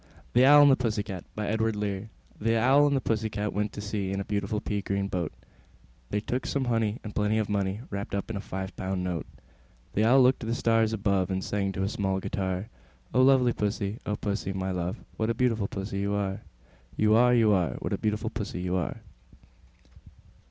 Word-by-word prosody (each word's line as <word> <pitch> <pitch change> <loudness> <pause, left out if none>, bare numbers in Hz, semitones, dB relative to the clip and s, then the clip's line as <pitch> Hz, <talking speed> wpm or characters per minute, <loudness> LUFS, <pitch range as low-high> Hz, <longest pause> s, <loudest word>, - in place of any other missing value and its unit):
THE 125 +2 +6
OWL 145 +1 +9
AND 145 - +7
THE - - +6
PUSSY 110 -4 -1
CAT. 95 -4 -7
I. 105 0 -1
The 110 +1 -2
Owl 135 +6 +5
and 140 - +2
the - - -1
Pussy 110 -2 0
Cat 105 0 -3
went 105 +1 -1
to 105 - -6
sea 105 -2 -3
In 100 - -2
a 100 - -3
beautiful 100 +1 -1
pea 105 -1 -2
green 100 0 -1
boat: 90 -4 -2 0.8
They 105 - 0
took 120 +4 -3
some 140 -2 0
honey, 115 -2 0
and 105 - -7
plenty 105 +1 +1
of 110 -2 0
money 100 +1 -1
Wrapped 100 0 -4
up 100 +2 -3
in - - -4
a 100 - -3
five 95 -1 -5
pound 95 -1 -2
note. 90 -3 -3 0.7
The 105 - +2
Owl 130 +4 +6
looked 125 +1 +4
up - - -31
to - - -6
the 115 - 0
stars 115 -2 +2
above, 100 -3 +1
And 95 0 -1
sang 100 -1 -1
to 95 - -2
a - - +1
small 95 -2 -1
guitar, 95 +1 -2 0.5
"O 130 - +4
lovely 130 -2 +5
Pussy, 105 0 -2
O 105 - 0
Pussy, 100 -2 -3
my 95 0 -2
love, 90 0 -2 0.2
What 110 0 0
a 115 - 0
beautiful 115 -4 +1
Pussy 100 0 -4
you 100 +1 0
are, 95 -1 -2 0.6
You 110 0 +4
are, 125 +2 +5
You 115 -3 +4
are! 90 -4 +2
What - - -4
a - - 0
beautiful 110 +1 -1
Pussy 100 -5 -4
you 90 0 -1
are!" 90 - -3
105 Hz, 215 wpm, -28 LUFS, 100-115 Hz, 0.8 s, OWL